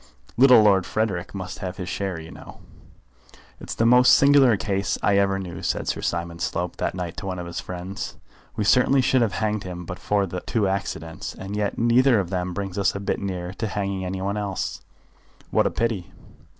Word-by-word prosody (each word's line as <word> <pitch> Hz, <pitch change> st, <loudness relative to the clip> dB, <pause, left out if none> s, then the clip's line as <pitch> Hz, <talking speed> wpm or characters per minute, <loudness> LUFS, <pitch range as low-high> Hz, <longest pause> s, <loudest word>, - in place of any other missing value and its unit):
Little 125 Hz, -2 st, +7 dB
Lord 95 Hz, -4 st, +4 dB
Frederick 95 Hz, -1 st, -2 dB
must 95 Hz, -2 st, -6 dB
have 95 Hz, 0 st, -5 dB
his 90 Hz, -, -5 dB
share, 95 Hz, -3 st, -3 dB
you 80 Hz, 0 st, -10 dB
know." -, -, -12 dB, 1.0 s
"It's -, -, -6 dB
the 115 Hz, -, +1 dB
most 125 Hz, +2 st, +7 dB
singular 140 Hz, -5 st, +5 dB
case 100 Hz, -1 st, -1 dB
I 100 Hz, -1 st, +4 dB
ever 100 Hz, -1 st, +2 dB
knew," 90 Hz, -3 st, -6 dB
said -, -, -2 dB
Sir -, -, -1 dB
Simon 85 Hz, 0 st, -3 dB
Slope 85 Hz, +1 st, -2 dB
that -, -, -2 dB
night 90 Hz, -2 st, -5 dB
to -, -, -5 dB
one 95 Hz, -1 st, -3 dB
of 90 Hz, -, -5 dB
his 85 Hz, 0 st, -5 dB
friends. 90 Hz, +2 st, -6 dB, 0.4 s
"We 110 Hz, -, -1 dB
certainly 125 Hz, +5 st, +4 dB
should 130 Hz, 0 st, +3 dB
have 110 Hz, -5 st, +1 dB
hanged 105 Hz, 0 st, -1 dB
him 90 Hz, -1 st, -7 dB
but 90 Hz, -, -7 dB
for 100 Hz, -1 st, +1 dB
the 90 Hz, -1 st, -5 dB
two 110 Hz, -5 st, 0 dB
accidents, 95 Hz, -4 st, -4 dB
and 95 Hz, +2 st, -6 dB
yet 105 Hz, -1 st, -1 dB
neither 120 Hz, +1 st, +4 dB
of 95 Hz, -2 st, -3 dB
them 90 Hz, -1 st, -2 dB
brings 100 Hz, -1 st, -4 dB
us 100 Hz, 0 st, +1 dB
a -, -, -3 dB
bit 100 Hz, -, -2 dB
nearer 90 Hz, -2 st, -4 dB
to 110 Hz, +3 st, -3 dB
hanging 100 Hz, -2 st, -3 dB
any 95 Hz, +1 st, -4 dB
one 100 Hz, +2 st, -1 dB
else." 100 Hz, -2 st, -3 dB, 0.7 s
"What -, -, +3 dB
a -, -, +1 dB
pity!" 115 Hz, -6 st, -2 dB
100 Hz, 205 wpm, -24 LUFS, 90-105 Hz, 1.0 s, Little